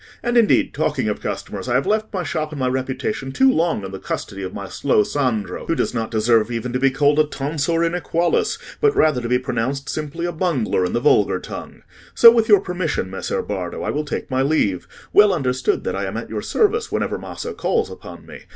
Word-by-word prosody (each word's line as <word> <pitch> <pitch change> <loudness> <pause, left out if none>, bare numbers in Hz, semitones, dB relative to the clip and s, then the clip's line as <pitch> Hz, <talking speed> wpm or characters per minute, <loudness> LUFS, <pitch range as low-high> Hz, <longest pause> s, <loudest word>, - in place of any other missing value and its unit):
And, 240 0 0
indeed, 230 -3 +3
talking - - -1
of - - -3
customers, - - -5
I - - +1
have - - +2
left 215 0 0
my 185 -3 -2
shop 155 -1 -3
and 150 - -6
my 130 - +1
reputation 130 0 -2
too 265 - +4
long 165 - 0
in 95 - -7
the 95 - -7
custody 100 - -5
of 95 -1 -4
my - - -6
slow 105 - +2
Sandro, 110 -9 -2
who 165 - +1
does - - -1
not 115 -2 -2
deserve 110 0 +2
even 120 +1 -4
to 125 - 0
be 135 - +4
called 145 +2 +2
a - - +7
tonsor 150 +3 -1
inequalis, 170 0 0 0.2
but 430 -2 +3
rather 155 - +3
to 120 - -4
be 125 - +3
pronounced 130 +3 -3
simply 155 +2 -4
a 175 - -1
bungler 155 - 0
in 90 - -3
the - - +1
vulgar - - +3
tongue. - - -9 0.3
So 230 - +9
with 230 -1 +1
your 205 -3 +7
permission, 175 - -2
Messer 95 - -3
Bardo, - - -4
I - - -1
will 150 - -1
take 150 - -5
my 130 0 +1
leave—well 150 - +2
understood 130 -5 0
that - - -2
I 100 0 -2
am 95 +3 -4
at 115 - -6
your 105 -2 -3
service 440 - +1
whenever - - -1
Maso 465 - -6
calls 440 +2 -1
upon - - -11
me. - - -12
140 Hz, 220 wpm, -21 LUFS, 120-175 Hz, 0.3 s, So